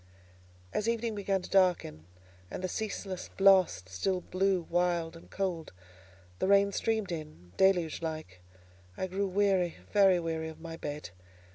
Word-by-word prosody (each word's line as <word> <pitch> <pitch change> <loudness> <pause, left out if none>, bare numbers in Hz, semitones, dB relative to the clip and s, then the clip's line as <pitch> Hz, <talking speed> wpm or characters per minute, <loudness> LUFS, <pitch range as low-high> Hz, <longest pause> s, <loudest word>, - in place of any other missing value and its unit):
As 215 +2 0
evening 230 -1 -1
began 195 -2 -1
to - - -8
darken, 175 - +2 0.4
and - - -6
the - - +1
ceaseless 195 -2 -4
blast 190 - +5
still 180 - -1
blew 185 0 0
wild 175 -1 0
and 165 - -14
cold, 180 - -3
and 90 0 -24
the - - +1
rain 200 0 +5
streamed 220 -3 -1
on, 155 - -8
deluge 180 -5 +3
like, 155 - -5 0.6
I - - -1
grew 195 +2 -1
weary—very 190 0 +2
weary 160 -1 -3
of 160 - -11
my 165 0 -7
bed. 150 - -6
180 Hz, 145 wpm, -31 LUFS, 155-195 Hz, 0.6 s, blast